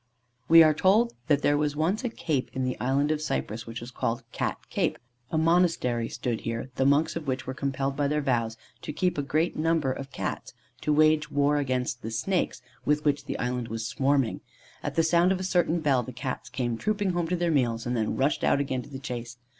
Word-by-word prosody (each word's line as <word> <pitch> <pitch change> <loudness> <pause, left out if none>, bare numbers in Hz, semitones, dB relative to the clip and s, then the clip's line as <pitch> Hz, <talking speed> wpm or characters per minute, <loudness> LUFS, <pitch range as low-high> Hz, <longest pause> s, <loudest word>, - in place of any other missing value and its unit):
We 165 0 +10
are 155 -1 +5
told 215 +9 +3
that 145 -3 +2
there 145 0 +3
was 150 -1 0
once 180 - 0
a 245 - 0
Cape 155 - -2
in 130 - -2
the 130 0 -1
Island 140 +4 +1
of 155 -1 -1
Cyprus, 110 - -3
which 115 +1 -5
was 120 +1 -8
called 120 0 -2
Cat - - -2
Cape. - - 0 0.3
A 160 - -1
monastery 160 -8 +2
stood 120 -1 -3
here, 115 +3 -4
the 135 +2 +1
monks 145 +3 +3
of 165 -3 -5
which 130 0 -2
were 130 - -4
compelled 135 0 -2
by 145 0 +1
their 150 +1 +1
vows 115 -5 0 0.2
to 150 - -5
keep 180 0 0
a - - +2
great 155 +4 0
number 160 -3 +1
of 135 +1 -6
Cats, - - -4 0.3
to 150 - 0
wage 155 0 +4
war 145 0 +2
against 130 -3 -1
the 110 - -5
snakes, 170 +12 -1 0.2
with 150 +1 +1
which 145 -1 +1
the - - -3
Island 125 -1 -2
was 115 0 -4
swarming. 135 0 +1 0.4
At - - -4
the 165 - +4
sound 170 +3 +4
of 190 - 0
a - - -3
certain 175 -2 +1
bell 140 -5 +3
the 125 - -7
Cats 125 0 -5
came 120 -3 -2
trooping 205 -3 0
home 175 -1 -1
to 180 - 0
their 175 -1 0
meals, 120 -6 +1
and 125 0 -1
then 110 -2 -1
rushed 140 +3 +1
out - - +3
again 130 -2 -1
to 125 - -13
the 135 - -6
chase. 120 -3 -6
140 Hz, 225 wpm, -27 LUFS, 125-160 Hz, 0.4 s, We